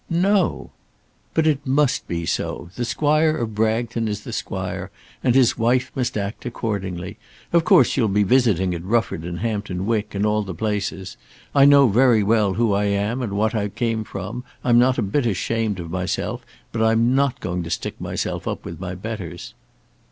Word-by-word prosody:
"No!" 185 +2 +1 0.6
"But 160 - +3
it 145 -3 +1
must 140 0 +1
be 85 -1 -3
so. 85 - -3
The 120 - -2
Squire 155 +4 +2
of 115 -2 -3
Bragton 110 +1 0
is 105 -1 -3
the - - -7
Squire, - - -4 0.3
and 125 -1 +3
his 130 -3 +4
wife 125 +3 +2
must 125 -4 -2
act 100 +1 -4
accordingly. 100 -5 -4 0.3
Of 170 -1 +4
course 130 - +5
you'll 115 - +2
be 105 +1 +2
visiting 100 -5 +2
at 85 -1 -5
Rufford 110 -4 0
and 85 0 -5
Hampton 105 -5 -2
Wick, 105 -2 -1
and 100 +1 0
all 105 0 +2
the 95 -4 -6
places. 100 -1 -3 0.4
I 140 -1 +6
know 140 -1 +7
very 115 0 +4
well 105 -2 +2
who 115 -2 +2
I 100 +1 +1
am, 100 +5 0
and 110 -5 -3
what 110 +2 +1
I 105 -2 0
came 115 +1 -1
from. 105 +4 -6 0.2
I'm 120 -1 +5
not 130 +1 +3
a - - +1
bit 120 +6 0
ashamed 110 0 -1
of 85 -1 -6
myself, 90 0 -2 0.3
but 115 - -2
I'm 115 +2 +3
not 140 -1 +1
going 90 0 -3
to 80 - -6
stick - - -4
myself - - -3
up - - -4
with 85 - -7
my 95 0 -5
betters." 95 -4 -7
110 Hz, 190 wpm, -22 LUFS, 100-125 Hz, 0.6 s, know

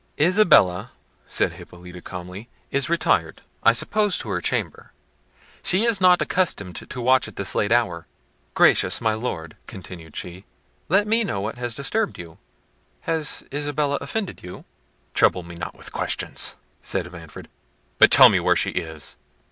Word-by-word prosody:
"Isabella," 150 - +4 0.3
said - - 0
Hippolita 90 0 -12
calmly, 90 +5 -9 0.2
"is 140 +1 0
retired, 105 - 0 0.2
I - - +6
suppose, 210 -3 0
to 110 - -7
her 90 -3 -2
chamber: - - -3 0.7
she 190 +4 +2
is 230 -4 +2
not 180 -1 +5
accustomed 100 - -1
to 130 - -7
watch 130 +1 +3
at - - -11
this 100 - -1
late 105 - 0
hour. 90 -9 +1 0.5
Gracious - - +4
my 110 -2 +1
Lord," 95 -9 -5
continued 85 -4 -11
she, 90 +2 -7 0.5
"let 195 +5 +3
me 225 +2 +2
know 100 - -3
what 110 +5 -5
has 120 -1 -4
disturbed 205 +10 -2
you. 85 -2 -11 0.6
Has 160 -3 -2
Isabella 145 0 -1
offended 195 +7 -4
you?" 90 0 -10 0.5
"Trouble 90 - +2
me 85 0 -11
not 85 0 -7
with - - -12
questions," - - -3 0.3
said 90 -2 -3
Manfred, 85 -3 -11 0.5
"but - - +8
tell - - +10
me - - +2
where - - +2
she - - 0
is." 80 -4 -5
115 Hz, 155 wpm, -23 LUFS, -, 0.7 s, tell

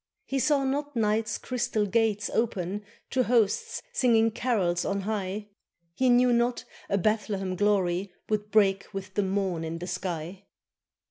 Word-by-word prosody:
He 270 - -1
saw 280 +1 +3
not 285 +1 -2
night's 215 -1 +1
crystal 235 -4 -1
gates 210 -1 +1
open 205 -3 -1 0.3
To 260 - +2
hosts 230 -4 +1
singing 225 - +4
carols 195 -8 0
on 200 0 -1
high, 205 0 -3 0.4
He 260 +7 +2
knew 245 0 +5
not 240 +1 +1 0.2
a 200 - +2
Bethlehem 200 -2 0
glory 190 -2 +1 0.2
Would 210 -1 -1
break 195 -2 +3
with 190 -1 -6
the 205 - +1
morn 190 -3 -1
in 165 +1 -4
the 175 - -6
sky! 180 +1 -5
210 Hz, 145 wpm, -27 LUFS, 190-230 Hz, 0.4 s, knew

